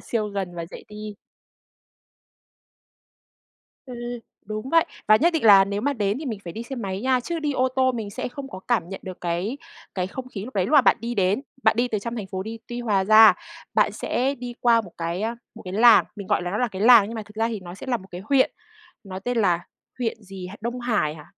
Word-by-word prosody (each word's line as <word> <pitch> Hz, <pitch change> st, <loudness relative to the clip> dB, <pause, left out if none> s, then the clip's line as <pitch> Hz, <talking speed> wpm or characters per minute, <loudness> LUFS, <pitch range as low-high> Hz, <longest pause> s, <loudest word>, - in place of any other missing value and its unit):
siêu 215 Hz, -3 st, -2 dB
gần 195 Hz, -3 st, -4 dB
và 170 Hz, -1 st, -5 dB
dễ -, -, -9 dB
đi. 210 Hz, -1 st, -8 dB, 2.7 s
Ừm, 250 Hz, -2 st, -8 dB, 0.5 s
đúng 215 Hz, +4 st, -5 dB
vậy. 330 Hz, -1 st, +5 dB, 0.2 s
Và 215 Hz, -, +8 dB
nhất 335 Hz, +9 st, +3 dB
định 320 Hz, -7 st, -1 dB
là 200 Hz, -3 st, +8 dB
nếu 200 Hz, +1 st, -3 dB
mà 285 Hz, +5 st, 0 dB
đến 210 Hz, -3 st, -1 dB
thì 305 Hz, -, -6 dB
mình 225 Hz, -5 st, -3 dB
phải 170 Hz, -, -6 dB
đi 225 Hz, -, -6 dB
xe 265 Hz, +3 st, -7 dB
máy 195 Hz, -4 st, -4 dB
nha, 255 Hz, +1 st, +2 dB
chứ 335 Hz, +7 st, -4 dB
đi 300 Hz, -2 st, -1 dB
ô 260 Hz, -1 st, +1 dB
tô 260 Hz, 0 st, +3 dB
mình 220 Hz, -4 st, -5 dB
sẽ -, -, -4 dB
không 270 Hz, +2 st, -8 dB
có 185 Hz, -, -8 dB
cảm 215 Hz, -9 st, +1 dB
nhận 195 Hz, -, -7 dB
được 185 Hz, -1 st, -8 dB
cái 175 Hz, +8 st, -2 dB, 0.4 s
cái 180 Hz, -2 st, -1 dB
không 255 Hz, +6 st, -7 dB
khí 200 Hz, -5 st, -6 dB
lúc 255 Hz, -, -10 dB
đấy, 190 Hz, -3 st, +1 dB
lúc -, -, -4 dB
mà 295 Hz, -, +8 dB
bạn -, -, +4 dB
đi 235 Hz, +2 st, -3 dB
đến. 195 Hz, +2 st, +1 dB, 0.2 s
Bạn -, -, +4 dB
đi 245 Hz, +2 st, +1 dB
từ 215 Hz, -, -1 dB
trong 235 Hz, +4 st, -5 dB
thành 210 Hz, -4 st, -4 dB
phố 190 Hz, 0 st, -4 dB
đi 225 Hz, +3 st, -7 dB
Tuy 240 Hz, 0 st, -4 dB
Hòa 205 Hz, -5 st, +1 dB
ra, 215 Hz, +1 st, +8 dB, 0.4 s
bạn -, -, +3 dB
sẽ 265 Hz, +3 st, -1 dB
đi 245 Hz, -2 st, -7 dB
qua 235 Hz, -1 st, +4 dB
một 190 Hz, -6 st, -11 dB
cái, 170 Hz, +3 st, -3 dB
a, 225 Hz, +2 st, -1 dB, 0.2 s
một 225 Hz, -, -11 dB
cái 185 Hz, -, -6 dB
làng, 230 Hz, +3 st, +7 dB
mình 200 Hz, -2 st, -7 dB
gọi -, -, +1 dB
là 175 Hz, -, -3 dB
nó 205 Hz, -, -2 dB
là 245 Hz, -, +1 dB
cái 195 Hz, -2 st, -5 dB
làng 235 Hz, -2 st, +8 dB
nhưng 230 Hz, -, -6 dB
mà 220 Hz, -, -4 dB
thực 210 Hz, 0 st, -17 dB
ra 225 Hz, +1 st, +1 dB
thì 220 Hz, -3 st, -4 dB
nó 175 Hz, -1 st, -9 dB
sẽ 195 Hz, -, -10 dB
là 255 Hz, -2 st, +1 dB
một 190 Hz, -4 st, -13 dB
cái 180 Hz, +1 st, -7 dB
huyện, 265 Hz, +3 st, +3 dB, 0.5 s
nó 190 Hz, -1 st, -6 dB
tên 245 Hz, +5 st, -3 dB
là 175 Hz, -5 st, +2 dB, 0.4 s
huyện 225 Hz, -2 st, -3 dB
gì 190 Hz, -2 st, -8 dB
H 190 Hz, -, -9 dB
Đông 240 Hz, +3 st, -4 dB
Hải 215 Hz, -11 st, 0 dB
hả? 150 Hz, -2 st, -12 dB
215 Hz, 255 wpm, -24 LUFS, 195-245 Hz, 2.7 s, Và